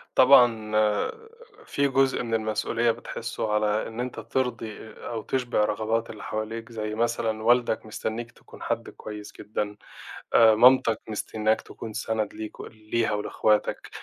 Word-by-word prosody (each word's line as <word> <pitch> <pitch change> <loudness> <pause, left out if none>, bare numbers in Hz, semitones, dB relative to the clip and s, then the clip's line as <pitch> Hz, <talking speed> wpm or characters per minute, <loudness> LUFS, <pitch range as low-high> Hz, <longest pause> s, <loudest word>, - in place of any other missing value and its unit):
طبعًا 120 -5 +6
آآ، 110 - 0 0.4
في 140 0 +1
جزء 135 -1 +2
من 115 -2 -2
المسؤولية 110 +2 +1
بتحسُّه 115 -1 -4
على 105 0 +1
إن 115 +1 -6
أنت 125 -2 -4
تِرضي 115 -1 -2
أو 115 -2 -6
تشبِع 125 -4 0
رغبات 110 +2 -1
اللي 105 - -9
حواليك، 115 +2 -5
زي 105 -1 -3
مثلًا 115 -1 -1
والدك 120 -1 +2
مستنيك 110 +2 -4
تكون - - -15
حد - - -2
كويس 105 -1 -9
جدًا 105 -1 -4 0.6
آآ، 110 -1 +7
مامتك 120 -1 +5
مستنياك 110 0 0
تكون 110 -1 -9
سَنَد 110 -1 -2
ليك 110 -1 -6
ليها 110 +1 -2
ولاخواتك 105 +1 0
110 Hz, 135 wpm, -26 LUFS, 110-120 Hz, 0.6 s, آآ